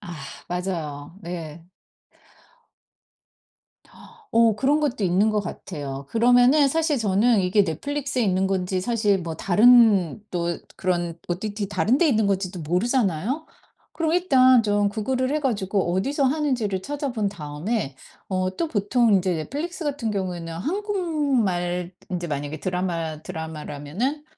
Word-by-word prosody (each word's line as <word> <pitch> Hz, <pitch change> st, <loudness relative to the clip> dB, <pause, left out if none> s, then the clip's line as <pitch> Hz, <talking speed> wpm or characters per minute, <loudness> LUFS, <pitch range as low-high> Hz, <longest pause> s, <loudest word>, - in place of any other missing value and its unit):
아 175 Hz, -, -8 dB, 0.4 s
맞아요. 170 Hz, -4 st, -4 dB
네. 165 Hz, -2 st, -7 dB, 2.7 s
어 230 Hz, -2 st, +4 dB
그런 280 Hz, +6 st, +2 dB
것도 265 Hz, -8 st, -1 dB
있는 190 Hz, +5 st, +3 dB
것 210 Hz, -1 st, +1 dB
같아요. 145 Hz, -7 st, -6 dB
그러면은 245 Hz, -, +5 dB
사실 315 Hz, -1 st, +1 dB
저는 215 Hz, +1 st, +3 dB
이게 190 Hz, +3 st, +3 dB
넷플릭스에 275 Hz, -, -2 dB
있는 190 Hz, -2 st, +1 dB
건지 185 Hz, -1 st, -1 dB
사실 210 Hz, -2 st, +1 dB
뭐 165 Hz, -2 st, -5 dB
다른 210 Hz, -1 st, +5 dB
또 170 Hz, -1 st, -2 dB, 0.2 s
그런 175 Hz, -2 st, -1 dB
OTT 205 Hz, +3 st, -3 dB
다른 215 Hz, +6 st, +1 dB
데 345 Hz, -, +4 dB
있는 220 Hz, -6 st, +2 dB
건지도 185 Hz, -2 st, -1 dB
모르잖아요. 210 Hz, -, 0 dB, 0.5 s
그럼 320 Hz, -1 st, -1 dB
일단 260 Hz, -9 st, +5 dB
좀 205 Hz, -1 st, +2 dB
구글을 255 Hz, +6 st, -1 dB
해 305 Hz, -, 0 dB
가지고 200 Hz, -8 st, 0 dB
어디서 275 Hz, +10 st, 0 dB
하는지를 255 Hz, -9 st, 0 dB
찾아본 270 Hz, -7 st, -2 dB
다음에 155 Hz, -, -3 dB, 0.3 s
어 185 Hz, -1 st, 0 dB
또 330 Hz, -, -1 dB
보통 225 Hz, 0 st, +2 dB
이제 180 Hz, -1 st, 0 dB
넷플릭스 305 Hz, -, -4 dB
같은 275 Hz, -6 st, -2 dB
경우에는 180 Hz, -4 st, -3 dB
한국말 270 Hz, -, -1 dB, 0.2 s
인제 175 Hz, -1 st, -3 dB
만약에 145 Hz, 0 st, -4 dB
드라마 170 Hz, -4 st, -2 dB
드라마라면은 160 Hz, -, -4 dB
200 Hz, 290 characters per minute, -24 LUFS, 175-255 Hz, 2.7 s, 그러면은